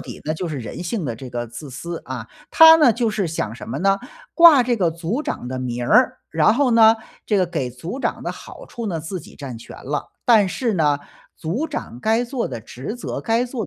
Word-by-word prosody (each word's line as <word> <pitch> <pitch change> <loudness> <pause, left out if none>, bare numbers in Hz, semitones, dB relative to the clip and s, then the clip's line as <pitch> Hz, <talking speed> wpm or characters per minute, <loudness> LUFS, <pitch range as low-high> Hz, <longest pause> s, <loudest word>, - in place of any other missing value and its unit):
底 - - -9
呢， 155 - -1
就 175 +1 -4
是 150 - -4
人 115 +8 -6
性 180 0 -3
的 120 -4 -3
这 130 +1 -9
个 120 -1 -4
自 120 +5 -9
私， 170 +6 -6
啊， - - -6 0.2
他 320 0 +9
呢， 300 -7 +5
就 235 -1 0
是 205 -4 -1
想 115 -8 -3
什 - - -10
么 135 +5 -3
呢？ 195 +2 +2 0.4
挂 330 -7 +8
这 240 0 +1
个 175 -5 +1
组 170 - -3
长 125 - -4
的 130 - -4
名 120 -1 -3
儿， - - +4
然 165 +7 +3
后 270 -1 +2
呢， 225 -1 +6 0.3
这 210 - +2
个 185 - +3
给 130 -7 -3
组 165 - -7
长 - - -2
的 - - -3
好 - - -12
处 235 -1 -6
呢， 170 -5 -2
自 175 +3 -5
己 - - -15
占 130 -5 -7
全 115 - -12
了， 145 +2 -3
但 215 -5 +5
是 235 +3 -1
呢， 150 -4 +2 0.4
组 210 - -3
长 125 - -6
该 225 - +1
做 245 0 -3
的 - - -5
职 130 - -7
责、 - - -5
该 230 +2 +1
做 240 -4 -5
180 Hz, 250 characters per minute, -21 LUFS, -, 0.4 s, 他